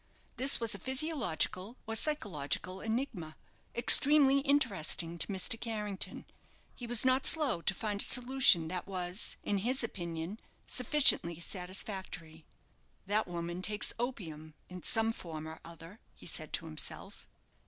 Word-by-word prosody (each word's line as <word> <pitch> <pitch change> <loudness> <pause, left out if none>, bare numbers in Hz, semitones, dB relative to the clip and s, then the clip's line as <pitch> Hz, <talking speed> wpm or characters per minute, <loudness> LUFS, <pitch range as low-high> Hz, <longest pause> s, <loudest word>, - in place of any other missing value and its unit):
This 270 +3 +5
was 230 -2 +1
a 200 - -6
physiological 255 - -1
or 225 - -4
psychological 190 - -2
enigma, 220 - -4 0.4
extremely 275 +3 +6
interesting 200 - +1
to - - +1
Mr. 200 +3 -2
Carrington. 210 -4 -3 0.5
He 240 - -9
was 240 0 +1
not 260 +1 +3
slow 285 - +2
to 195 - +1
find 205 -1 -2
a - - +5
solution 250 -10 +4
that 180 +2 -5
was, 185 0 -1
in 200 -1 -1
his 250 +5 -1
opinion, 170 -1 -5 0.3
sufficiently 250 - +3
satisfactory. 180 -3 -6 0.6
"That 210 +2 0
woman 175 0 -5
takes 210 +2 -3
opium 160 -11 -6
in 180 0 -9
some 225 +5 +1
form 160 -6 -8
or 160 0 -9
other," 170 +5 -12 0.2
he - - -15
said - - -3
to - - -3
himself. - - -6
200 Hz, 135 wpm, -32 LUFS, 170-245 Hz, 0.6 s, extremely